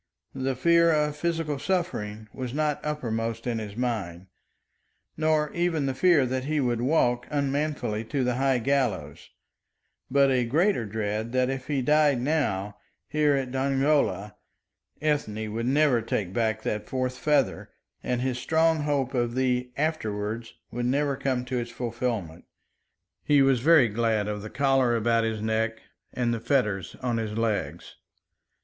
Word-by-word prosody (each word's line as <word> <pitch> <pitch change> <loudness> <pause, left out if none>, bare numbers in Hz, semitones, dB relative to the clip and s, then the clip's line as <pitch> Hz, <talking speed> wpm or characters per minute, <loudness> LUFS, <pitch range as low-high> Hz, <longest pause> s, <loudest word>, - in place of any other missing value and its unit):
The 135 0 -2
fear 170 +5 +4
of 150 -1 +1
physical 160 -2 -2
suffering 110 - -2
was 130 0 -5
not 150 -1 0
uppermost 115 -6 -3
in 120 -2 -1
his 105 -1 -7
mind, 105 -8 -3 0.9
nor 155 -1 +1
even 170 -4 0
the 135 - 0
fear 165 -1 +4
that 130 +1 -2
he 155 +1 0
would 120 -3 0
walk 125 -3 +1
unmanfully 140 -6 -1
to 135 +3 -1
the 125 0 +1
high 135 -1 +2
gallows, 110 - -1 0.8
but 140 0 +4
a 125 -1 +2
greater 145 - +1
dread 110 +2 -3
that 130 0 +2
if 130 -1 -5
he 140 -3 0
died 150 -1 +3
now, 105 -8 -1 0.3
here, 150 -1 +2
at 130 -2 -2
Dongola, 135 -7 +1 0.7
Ethne 110 -8 -1
would 115 +2 -2
never 140 -3 +3
take 100 -4 -2
back 110 -1 0
that 105 0 -3
fourth 130 -1 -2
feather, 145 -4 +1 0.3
and 125 -1 -1
his 125 -1 -1
strong 160 +3 +2
hope 145 -3 -1
of 120 -2 0
the 125 -1 0
"afterwards" 115 -7 -2 0.2
would 120 +1 -2
never 140 +2 +1
come 130 -2 -1
to 125 -1 -2
its 120 0 -4
fulfilment. 115 -9 -4 0.8
He 145 -2 +4
was 135 -2 +3
very 155 -1 +6
glad 110 -1 0
of 105 -1 -3
the 110 - -7
collar 135 -3 +2
about 115 0 +2
his 110 -1 -2
neck 110 0 0 0.3
and 120 -1 0
the 115 - -2
fetters 105 - 0
on 120 -2 0
his 110 -2 -3
legs. 115 -2 -2
125 Hz, 155 wpm, -26 LUFS, 115-145 Hz, 0.9 s, very